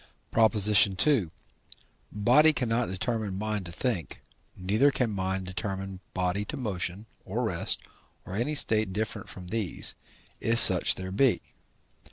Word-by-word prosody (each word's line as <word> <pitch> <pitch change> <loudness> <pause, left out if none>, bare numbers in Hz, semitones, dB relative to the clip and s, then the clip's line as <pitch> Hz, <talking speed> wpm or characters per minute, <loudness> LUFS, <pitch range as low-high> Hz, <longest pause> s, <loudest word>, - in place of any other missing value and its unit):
PROP. 110 -1 +3
II. 105 - +5 0.8
Body 125 +9 +4
cannot 120 -3 -1
determine 105 0 -3
mind 105 -2 -3
to - - -8
think, 95 -2 -4 0.3
neither 105 +10 +2
can 125 -5 -1
mind 95 -1 -3
determine 95 0 -5 0.2
body 90 +2 -1
to - - -6
motion 100 -4 -4 0.2
or 110 +6 -3
rest 90 -7 -1 0.4
or 90 - -9
any 125 +8 -1
state 110 -7 0
different 110 0 -4
from 90 -2 -8
these, 110 -5 -1 0.5
if 115 +1 0
such 95 -5 +6
there 95 0 -6
be. 125 +5 +1
105 Hz, 135 wpm, -27 LUFS, 95-115 Hz, 0.8 s, such